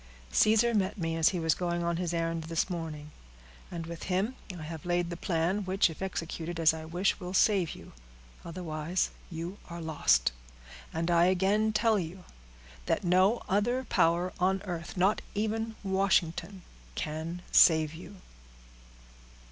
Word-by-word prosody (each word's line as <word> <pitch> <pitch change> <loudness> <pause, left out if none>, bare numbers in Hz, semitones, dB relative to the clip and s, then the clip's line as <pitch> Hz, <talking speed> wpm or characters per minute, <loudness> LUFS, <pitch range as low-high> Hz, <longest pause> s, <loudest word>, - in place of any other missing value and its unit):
Caesar 220 - +4
met 195 -1 0
me, 165 -3 -2
as 165 -1 +4
he 180 - -2
was 160 -1 +2
going 175 0 -2
on 170 0 0
his 175 -1 -2
errand 165 -1 -1
this 165 +3 -1
morning, 155 -3 -5 0.6
and 170 -2 -5
with 170 0 -7
him 190 +7 +1 0.2
I 160 - -7
have 160 -1 -7
laid 175 0 0
the - - -3
plan 175 +3 0
which, 190 -2 +2
if 160 - -12
executed 170 -2 -4
as 160 -1 +5
I 160 0 -7
wish, 175 +4 0
will 180 +1 -5
save 190 -5 +3
you—otherwise 155 - -5 0.2
you 170 +4 -6
are 170 0 -6
lost; 155 - +2 0.6
and 165 +2 -1
I 170 0 +5
again 195 +4 +2
tell 220 0 +3
you, 180 +1 -6 0.6
that - - +1
no 185 +6 +3
other 240 +7 +1
power 175 -5 +2
on 190 +2 +1
earth, 175 -2 -6
not 190 +4 +3
even 220 +1 -1
Washington, 190 -1 0 0.3
can 160 +3 -4
save 160 -2 +6
you." 175 +4 -10
175 Hz, 150 wpm, -30 LUFS, 165-190 Hz, 0.6 s, save